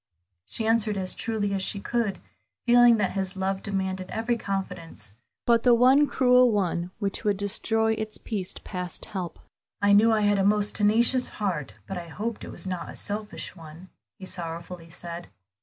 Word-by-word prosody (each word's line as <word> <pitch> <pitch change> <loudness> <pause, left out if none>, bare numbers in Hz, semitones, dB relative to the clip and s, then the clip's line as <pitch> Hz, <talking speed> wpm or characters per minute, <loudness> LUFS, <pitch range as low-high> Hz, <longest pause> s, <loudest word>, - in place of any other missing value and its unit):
She 220 - -3
answered 220 -2 +2
as 185 -1 -2
truly 215 -3 -2
as 195 - 0
she 200 +1 -1
could, 220 -2 -1 0.5
feeling 240 -1 +7
that 200 -3 +1
his 190 0 -2
love 190 0 -1
demanded 190 -2 -2
every 230 +2 0
confidence 190 - -5 0.3
but 235 -1 +4
the 245 -1 +6
one 260 +5 +6
cruel 250 -2 +5
one 180 -4 0
which 200 -1 -3
would 205 -2 +1
destroy 220 +2 0
its 220 -1 -4
peace 195 -5 -4
past 180 -2 -5
help. 185 -6 -5 0.4
"I 205 0 +4
knew 220 +3 +6
I 220 -1 +3
had 205 -1 +3
a - - +3
most 205 +1 +3
tenacious 230 +5 +4
heart, 180 - -3
but 190 -2 -4
I 170 - -8
hoped 215 +7 -4
it - - -7
was - - -3
not 185 -2 -4
a - - -8
selfish 210 -1 -4
one," 165 +2 -12 0.3
he 195 - -9
sorrowfully 170 -1 -5
said. 170 0 -7
205 Hz, 175 wpm, -26 LUFS, 185-225 Hz, 0.5 s, feeling